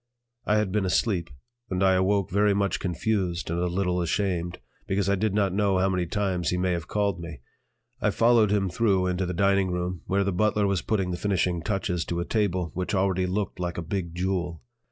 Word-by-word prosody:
I 105 - +3
had 105 -3 0
been 105 0 +1
asleep; 95 - 0 0.4
and 95 0 0
I 95 0 +5
awoke 95 +1 +1
very 100 +1 +3
much 100 -1 0
confused 90 -2 -1
and 85 - -1
a 90 - +1
little 90 0 0
ashamed, 85 0 -1 0.3
because 95 0 0
I 100 - +3
did 100 +1 0
not 100 -3 +2
know 100 -1 +2
how 95 +1 +2
many 90 -2 -1
times 95 -3 -1
he 90 - 0
may 90 0 +1
have 85 -2 -3
called 100 -3 0
me. 85 -6 -8 0.6
I - - +3
followed 115 -2 +4
him 100 -1 +1
through 95 0 +1
into 90 0 -1
the 90 - -2
dining 100 0 +2
room, 90 -1 -3
where 100 +1 +2
the 100 -1 -1
butler 105 +2 +2
was 100 -3 +1
putting 95 -4 -1
the 90 - -2
finishing 90 -3 0
touches 90 -2 -1
to 85 - -2
a 85 - -2
table 95 -6 0
which 90 +3 -2
already 95 -1 +1
looked 100 +1 -2
like 90 -1 -3
a 85 - -3
big 85 -1 -4
jewel. 90 -2 -2
95 Hz, 215 wpm, -26 LUFS, 90-100 Hz, 0.6 s, I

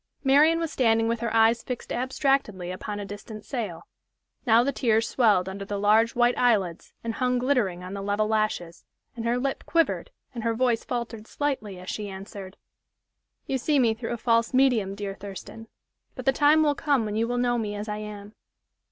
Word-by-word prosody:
Marian 295 +4 +5
was 330 -2 -2
standing 225 -4 +2
with 230 0 0
her 235 -1 -2
eyes 225 +1 +4
fixed 250 -2 -5
abstractedly 255 -7 0
upon 205 +3 -5
a 205 - -5
distant 205 +2 -9
sail. 215 - -4 0.6
Now 230 +1 +6
the 280 - 0
tears 225 -4 +1
swelled 205 -7 +3
under 195 +1 -5
the 200 +1 -4
large 215 +3 +3
white 240 0 +3
eyelids 200 -9 +1
and 230 -1 -2
hung 250 0 0
glittering 245 -9 0
on 185 +1 -7
the 200 - -4
level 205 +2 0
lashes, 215 -6 -1 0.3
and 230 -1 -5
her 235 +1 +1
lip 270 +2 -2
quivered 335 +8 +1 0.2
and 235 -3 -5
her 230 -1 0
voice 240 -1 +1
faltered 235 -3 -5
slightly 220 -10 -3
as 185 - -11
she 210 -1 -4
answered: 195 0 -9 0.9
"You 265 - -1
see 295 +4 +1
me 235 -4 +4
through 230 +1 -5
a - - -3
false 230 +1 +1
medium, 235 -7 +3
dear 200 -1 -4
Thurston, 200 +3 -9 0.5
but - - -7
the 270 - +4
time 300 +3 +5
will 295 -1 +3
come 280 -5 +1
when 210 0 -3
you 225 +1 +1
will 245 +1 -1
know 245 -1 +1
me 210 -2 -3
as 205 +1 -5
I 210 0 -3
am." 210 -1 -8
225 Hz, 195 wpm, -26 LUFS, 205-250 Hz, 0.9 s, Now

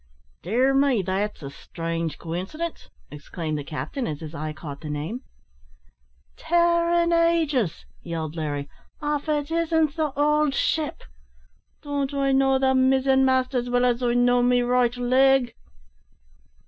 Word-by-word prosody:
"Dear 250 +9 +1
me! 270 -6 +2
that's 195 0 -3
a 140 - -6
strange 165 +1 -4
coincidence," 190 - -5 0.2
exclaimed 155 +2 -5
the - - -5
captain, 155 - -4
as 150 -2 -4
his 160 0 -8
eye 155 -1 -4
caught 150 -2 -9
the 155 - -7
name. 155 - -4 1.1
"Tare 340 0 +2
an' 340 0 +2
ages!" 320 - +1 0.2
yelled 160 -2 -5
Larry, 145 -3 -3 0.3
"av 295 0 -2
it 295 0 -1
isn't 325 -2 +1
the 310 -3 -1
owld 300 -1 +2
ship! 310 +1 -1 0.8
Don't 285 -1 -2
I 275 -1 +1
know 270 0 +3
the 265 0 +2
mizzen 265 0 +3
mast 260 0 +1
as 245 -1 -1
well 245 0 +2
as 245 0 +1
I 240 -1 +1
know 245 0 +3
me 245 0 +3
right 245 0 +1
leg?" 255 0 +3
255 Hz, 145 wpm, -24 LUFS, -, 1.1 s, know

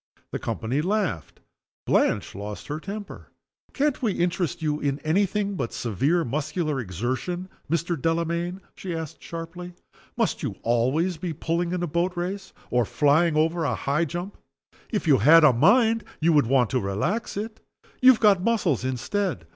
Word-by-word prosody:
The - - -3
company 125 +6 -2
laughed. 180 - -2 0.4
Blanche - - +1
lost 100 +1 -7
her 150 +1 -3
temper. 200 +3 -8 0.4
"Can't 290 -1 0
we 220 -6 +1
interest 175 -2 -1
you 150 -1 0
in 140 -1 -1
any 185 +6 +2
thing 200 +1 -2
but 130 -11 -3
severe 140 - 0
muscular 150 +3 -2
exertion, 130 - -3 0.2
Mr. 170 +2 0
Delamayn?" 170 +3 -1
she 180 -3 -5
asked, 160 -3 -6
sharply. 175 +2 -7 0.4
"Must - - 0
you - - -3
always 130 +10 +1
be 165 0 -4
pulling 170 +3 -1
in 180 -1 -2
a - - 0
boat 175 +3 -1
race, 190 +3 -4 0.2
or 120 0 +3
flying 150 +7 +2
over 165 +2 +1
a 140 - 0
high 150 +5 0
jump? 175 +5 -6 0.5
If 210 -5 -2
you 140 -4 +5
had 160 +9 +7
a 150 - +7
mind, 225 - +4 0.2
you 165 +1 +3
would 145 -6 +4
want 125 -2 +3
to 130 - +2
relax 140 - -2
it. 220 +2 -5 0.4
You 255 - +8
have 255 - +6
got 205 -4 +5
muscles 190 - +1
instead. 130 - -2
165 Hz, 165 wpm, -25 LUFS, 140-185 Hz, 0.5 s, You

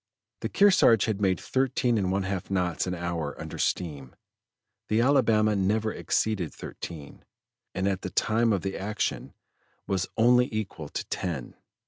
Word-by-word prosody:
The - - -3
Kearsarge 185 - +5
had 105 -3 -2
made 95 -3 +2
thirteen 130 -2 0
and 95 -4 0
one 100 0 0
half 95 -1 -3
knots 90 -2 0
an 90 - -2
hour 85 -4 -4
under - - -7
steam, 75 -7 -2 0.7
the 110 - +2
Alabama 115 -5 +3
never 105 +3 +1
exceeded 100 -7 -1
thirteen, 75 -4 -9 0.5
and 95 +1 0
at 95 -1 -1
the - - -4
time 115 +1 +2
of 100 -4 0
the 95 0 -3
action 105 +2 -3 0.5
was 95 -2 -1
only 125 +2 +5
equal 95 -9 -4
to - - -4
ten. 80 -10 -3
100 Hz, 150 wpm, -27 LUFS, 90-110 Hz, 0.7 s, Kearsarge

